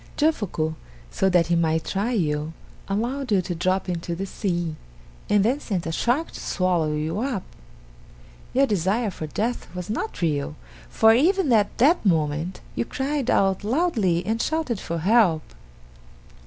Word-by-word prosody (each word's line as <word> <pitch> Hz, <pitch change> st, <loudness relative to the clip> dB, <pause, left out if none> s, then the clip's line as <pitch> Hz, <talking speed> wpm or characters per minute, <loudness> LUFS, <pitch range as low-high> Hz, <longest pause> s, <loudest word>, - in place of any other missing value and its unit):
Jofuku, 205 Hz, -, 0 dB, 0.4 s
so 190 Hz, -, +1 dB
that 175 Hz, -2 st, +4 dB
he 170 Hz, +1 st, +1 dB
might 160 Hz, -1 st, +1 dB
try 200 Hz, +5 st, -1 dB
you, 155 Hz, -7 st, -1 dB, 0.3 s
allowed 240 Hz, +6 st, -2 dB
you 200 Hz, -, +4 dB
to 175 Hz, -, -3 dB
drop 185 Hz, +3 st, 0 dB
into 170 Hz, -1 st, -3 dB
the 190 Hz, +3 st, -3 dB
sea, 175 Hz, -5 st, -2 dB, 0.5 s
and 205 Hz, -1 st, +4 dB
then 255 Hz, +6 st, +2 dB
sent 190 Hz, -, -3 dB
a 165 Hz, -, -2 dB
shark 245 Hz, -, 0 dB
to -, -, -9 dB
swallow 175 Hz, -5 st, 0 dB
you 155 Hz, +5 st, -2 dB
up. 240 Hz, -6 st, -2 dB, 1.1 s
Your 270 Hz, +2 st, +4 dB
desire 205 Hz, +1 st, 0 dB
for 160 Hz, -3 st, -6 dB
death 230 Hz, +10 st, -2 dB
was 180 Hz, +3 st, -4 dB
not 235 Hz, -, -3 dB
real, 150 Hz, -2 st, 0 dB, 0.3 s
for 220 Hz, 0 st, +5 dB
even 325 Hz, -, +3 dB
at 210 Hz, -2 st, +2 dB
that 300 Hz, +9 st, +4 dB
moment 160 Hz, -1 st, 0 dB
you -, -, -1 dB
cried 270 Hz, +1 st, -2 dB
out 195 Hz, 0 st, +2 dB
loudly 215 Hz, -, +1 dB
and 225 Hz, +2 st, 0 dB
shouted 315 Hz, -9 st, -1 dB
for 170 Hz, -2 st, -4 dB
help. 180 Hz, -3 st, +3 dB
195 Hz, 155 wpm, -24 LUFS, 170-240 Hz, 1.1 s, for